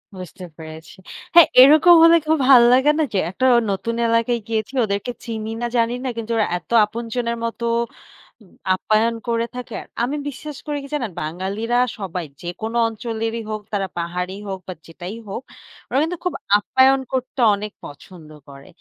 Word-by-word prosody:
বুঝতে 180 0 -9
পেরেছি। 160 +3 -11 0.4
হ্যাঁ, 340 - +9
এরকম 310 +6 +7
হলে 335 0 +7
খুব 315 0 +3
ভাল 260 -3 +8
লাগে 265 +4 +4
না? - - +3 0.3
একটা 255 +8 -2 0.3
নতুন 230 +4 -3
এলাকায় 230 +1 +1
গিয়েছি 225 +2 -3
ওদেরকে 200 +4 -3
চিনি 220 -1 -5
না, 240 - -1
জানি 230 +1 +1
না 260 - -1
কিন্তু 230 0 -5
ওরা 215 - +2
এত - - -15 0.2
আপনজনের 235 +1 -4
মতো 235 0 -4 0.8
উম 195 - -20 0.2
আপ্যায়ন 220 +4 +1
করে 230 0 0
থাকে। 250 -1 -7 0.3
আমি 275 +5 -1
বিশ্বাস 290 +1 -7
করি 295 - -2
কি 275 - -9
জানেন? 240 -8 -3
বাঙালিরা 195 +9 -2 0.2
সবাই 185 -4 -5 0.2
যেকোন 220 +6 -6
অঞ্চলেরই 225 0 -4
হোক 215 - -4
তারা 195 -1 -1
পাহাড়েই 180 +3 -4
হোক 190 -1 -4
বা, 185 - -5
যেটাই 175 +5 -8
হোক, 195 - -5 0.5
ওরা - - -2
কিন্তু 340 +3 -3
খুব 360 - 0 0.2
আপ্যায়ন 265 +5 +3
করতে 260 +1 -3 0.2
অনেক 210 +1 -6
পছন্দ 155 +2 -12 0.2
করে। 140 0 -13
225 Hz, 165 wpm, -21 LUFS, 190-250 Hz, 0.8 s, হ্যাঁ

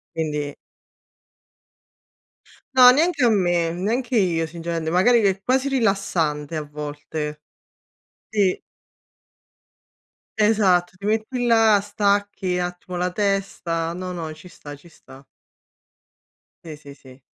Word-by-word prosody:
Quindi 150 -3 -3 2.2
No, 255 -1 +9
neanche 310 +3 +2
a 245 - +5
me, 175 -6 +1
neanche 230 +9 -2
io 170 -6 +1
sinceramente 165 0 -4
magari 190 +8 +4
che 205 - +3
è 195 0 -2
quasi 265 +2 +1
rilassante 175 - -1
a 155 - -2
volte. 150 +1 -6 0.9
Sì. 200 -4 0 1.8
Esatto, 195 -5 +2
ti 200 - -14
metti 225 +4 -1
là, 225 -3 +5
stacchi 200 -2 -1
attimo 180 0 -5
la 180 +1 -1
testa. 185 -4 -2
No, 180 +1 -6
no, 165 -3 -5
ci 155 +4 -14
sta, 145 -4 -11
ci 145 +4 -17
sta. 135 -4 -16 1.4
Sì, 160 -2 -8
sì, 145 -1 -13
sì. 130 -1 -17
180 Hz, 115 wpm, -22 LUFS, 160-210 Hz, 2.2 s, No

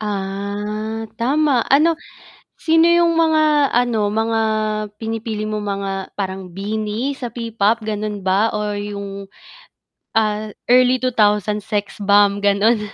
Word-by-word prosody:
Ah, 210 +2 -4 0.2
tama 270 0 +2
ano 320 +4 +3 0.6
sino 325 +1 +3
yung 340 -1 +3
mga 310 -4 +3
ano, 235 -4 +2
mga 225 0 0 0.6
pinipili 220 0 -4
mo 215 0 -2
mga 195 -2 -4
parang 190 -3 -5
BINI 215 +6 -3
sa 240 -3 -6
P-pop 230 -1 0
gano'n 210 -1 -4
ba 190 +4 +2
or 210 -1 -2
yung, 200 -1 -6 0.9
ah, 215 -1 +1 0.2
early 255 0 +4
2000s 210 -3 +1
Sexbomb 205 -1 +2
gano'n? 205 +3 +3
215 Hz, 110 wpm, -19 LUFS, 205-240 Hz, 0.9 s, early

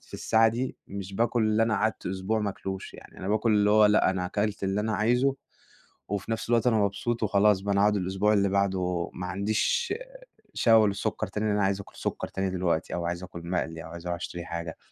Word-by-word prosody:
في - - -14
الساعة 115 0 +3
دي 125 +3 -3
مش 95 0 -6
باكل 115 +1 +1
اللي 110 +1 +2
أنا 115 -1 +2
قعدت 110 +2 -1
أسبوع 95 +4 -1
ما 105 -1 -1
آكلوش، 95 0 -6
يعني - - -13
أنا 95 - -5
باكل 110 +2 +2
اللي 105 0 +3
هو 105 0 +6
لأ، 105 -2 +4
أنا 90 -1 -2
أكلت 105 +1 -2
اللي 95 +2 0
أنا 110 +1 -1
عايزه 125 +5 +2 0.7
وفي 100 +2 -3
نفس 115 - -3
الوقت 115 -1 +3
أنا 115 - +3
مبسوط 105 +3 -1
وخلاص 105 -1 +3
بقى، 100 +1 -1
أنا 100 - +3
هاقعد 105 0 +3
الأسبوع 95 +2 +1
اللي 100 -1 +3
بعده 95 -3 0
ما 90 0 -5
عنديش 105 - 0 0.6
شهوة 115 -2 +5
للسكَر 105 +2 -2
تاني، 105 +3 -3
لإن 105 -1 +1
أنا 105 - +2
عايز 95 0 0
أكل 100 - -13
سكر - - -3
تاني 95 0 -2
دلوقتي 90 -3 -1
أو 85 -1 -2
عايز 85 +1 -3
أكل 85 -1 -9
مقلي 80 -2 -2
أو - - -8
عايز 85 +1 -9
أروح 85 0 -1
أشتري 85 0 -6
حاجة. 85 -2 -5
100 Hz, 220 wpm, -27 LUFS, 95-110 Hz, 0.7 s, هو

